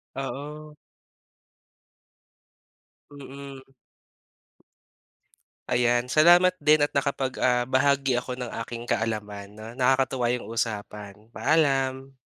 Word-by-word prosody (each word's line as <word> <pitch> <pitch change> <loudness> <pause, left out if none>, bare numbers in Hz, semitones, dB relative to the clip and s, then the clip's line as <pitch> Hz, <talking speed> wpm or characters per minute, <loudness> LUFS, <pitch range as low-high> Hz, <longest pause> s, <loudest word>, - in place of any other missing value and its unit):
Oo. 150 +3 -7 2.4
Mm. 140 -1 -10 2.1
Ayan, 120 0 +1
salamat 175 +5 +5
din 150 +1 +5
at 145 - +1
nakapag, 135 -2 -1
ah, 125 -1 +2
bahagi 135 -1 +2
ako 125 +1 -3
ng 125 -2 -4 0.2
aking 120 0 -8
kaalaman 105 -3 -3
'no, 110 +1 -11
nakakatuwa 130 -1 +1
yung 125 -2 -4
usapan. 105 -2 -5
Paalam. 135 -3 +1
130 Hz, 90 wpm, -25 LUFS, 120-140 Hz, 2.4 s, salamat